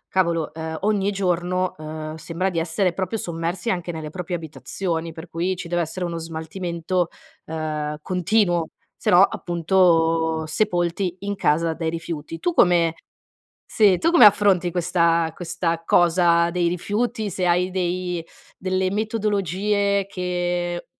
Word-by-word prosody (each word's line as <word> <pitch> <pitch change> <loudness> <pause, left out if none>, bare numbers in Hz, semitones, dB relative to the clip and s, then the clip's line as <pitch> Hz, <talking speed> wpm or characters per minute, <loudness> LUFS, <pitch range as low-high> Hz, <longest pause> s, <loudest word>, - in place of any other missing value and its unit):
cavolo, 170 -4 0
ehm, 160 0 -5
ogni 205 -1 +1
giorno, 180 -1 0
uhm, 155 0 -6
sembra 170 +4 -2
di 170 - -3
essere 170 +2 0
proprio 190 +4 -2
sommersi 170 +3 -3
anche 175 -1 -2
nelle 155 -1 -6
proprie 180 0 -4
abitazioni. 165 +1 -4
Per 160 +1 -10
cui 175 +3 -1
ci 175 - -7
deve 175 0 +1
essere 175 +2 -3
uno 170 -1 -4
smaltimento, 170 +2 -3 0.4
uhm, 155 -1 -3
continuo, 180 -1 +1 0.3
sennò 175 - +4
appunto 165 -3 +2
sepolti 175 +1 0
in 200 0 -3
casa 165 -2 +1
dai 160 -1 -2
rifiuti. 165 -1 -5
Tu 350 - -1
come 170 - +4 0.7
sì, 205 -4 +4
tu 330 - +2
come 325 -11 +8
affronti 195 -4 +4
questa 170 -1 +1
questa 165 -1 -2
cosa 170 -1 +4
dei 175 0 +1
rifiuti? 210 +4 -2
Se 180 +1 -1
hai 180 +1 +2
dei 180 -1 -2 0.4
delle 185 0 0
metodologie 200 -1 0
che 175 -2 -2
175 Hz, 135 wpm, -23 LUFS, 165-190 Hz, 0.7 s, come